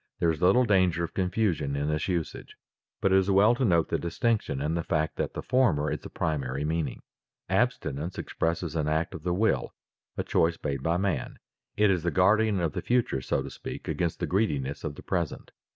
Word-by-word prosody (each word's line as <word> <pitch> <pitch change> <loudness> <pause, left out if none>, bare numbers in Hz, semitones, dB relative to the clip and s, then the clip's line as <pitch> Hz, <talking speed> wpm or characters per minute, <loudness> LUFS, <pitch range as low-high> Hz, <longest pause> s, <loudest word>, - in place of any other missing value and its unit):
There 85 - +2
is 80 - -5
little 95 +8 +5
danger 95 -5 +3
of 85 - -4
confusion 90 -7 0
in 70 +1 -1
this 75 -1 -1
usage, 85 -4 -3 0.5
but 95 - +2
it 95 - +7
is 95 +1 0
well 100 +4 +5
to 120 - -1
note 85 -8 +3
the - - 0
distinction 85 - -1
and 75 +4 -1
the 85 - 0
fact 80 -1 -1
that - - -2
the - - -4
former 90 - +2
is - - -2
the - - -10
primary 70 -2 -2
meaning. 80 -4 -2 0.5
Abstinence 75 +7 -1
expresses 85 -1 -2
an 75 -2 0
act 80 +2 0
of 80 - -7
the 90 +3 -1
will, 105 +6 0 0.4
a - - 0
choice 85 +1 +1
made 70 -3 -2
by 85 +4 +1
man. 95 -1 -2 0.4
It 105 -1 +4
is 90 -3 +1
the 85 - 0
guardian 100 +3 +3
of 85 -4 -1
the - - -3
future, 120 - +1
so 65 - -1
to 70 - -7
speak, - - -8
against 85 -2 -1
the - - 0
greediness 75 -9 -1
of 75 - -4
the - - -11
present. - - -3
85 Hz, 210 wpm, -28 LUFS, 75-95 Hz, 0.5 s, it